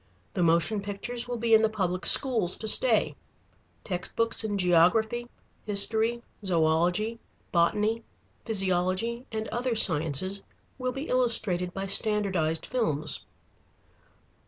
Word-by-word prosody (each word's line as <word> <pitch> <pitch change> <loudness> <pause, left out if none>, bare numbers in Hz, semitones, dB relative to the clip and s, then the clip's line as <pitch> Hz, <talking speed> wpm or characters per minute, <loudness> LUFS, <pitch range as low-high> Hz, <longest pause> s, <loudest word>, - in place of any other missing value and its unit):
The 180 - -2
motion 170 +5 +1
pictures 220 +5 -5
will 245 -1 -4
be 230 0 0
in 220 - +6
the 220 - +2
public 185 -4 -1
schools 225 -10 +5
to 220 - -4
stay. - - +3 0.7
Text 180 -3 -5
books 230 -1 0
in 205 -2 -3
geography, 200 +7 +1 0.3
history, 220 +3 +1 0.2
zoõlogy, 175 +5 0 0.3
botany, 210 +6 0 0.4
physiology, 195 +3 -2
and 220 0 -4
other 245 0 -2
sciences 175 0 +2 0.4
will 255 0 -2
be 270 +4 -7
illustrated 210 -8 +1
by 195 +2 -5
standardized 195 -6 0
films. 155 - -1
210 Hz, 115 wpm, -26 LUFS, 180-230 Hz, 0.7 s, in